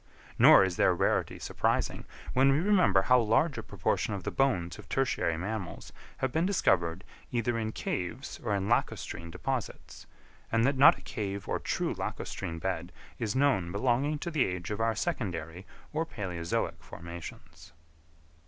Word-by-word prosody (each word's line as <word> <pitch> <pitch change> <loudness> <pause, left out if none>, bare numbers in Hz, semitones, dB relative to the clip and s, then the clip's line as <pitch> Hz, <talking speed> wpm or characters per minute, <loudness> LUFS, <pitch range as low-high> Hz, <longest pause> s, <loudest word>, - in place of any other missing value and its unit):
Nor - - +9
is 95 -2 -1
their - - +4
rarity - - 0
surprising, - - -1 0.3
when 135 +2 +5
we 135 - +3
remember 180 - +4
how 125 +3 +5
large 120 +7 +2
a - - -3
proportion 105 - -1
of 95 - -6
the - - -3
bones 120 -11 0
of - - -13
tertiary 120 -11 0
mammals 95 +1 -5 0.2
have 130 - -1
been 160 +5 +1
discovered 90 - +1 0.3
either 120 -1 0
in 110 -1 -2
caves 110 +6 -4
or 105 -4 0
in 100 0 -1
lacustrine 85 -6 -1
deposits; 130 +7 -5 0.4
and 115 +1 +3
that 140 +1 +2
not 150 +6 +7
a - - -14
cave 100 -3 -5
or - - -1
true - - -1
lacustrine 85 - -5
bed 90 0 -3 0.3
is 110 -2 -2
known 130 -11 +2
belonging 130 +8 +1
to 170 +4 -5
the 150 -5 +3
age 90 0 -4
of 105 - -2
our 115 0 +1
secondary 95 - -3 0.3
or 155 +2 +1
palæozoic 90 - -3
formations. 85 -1 -10
110 Hz, 160 wpm, -30 LUFS, 90-130 Hz, 0.4 s, Nor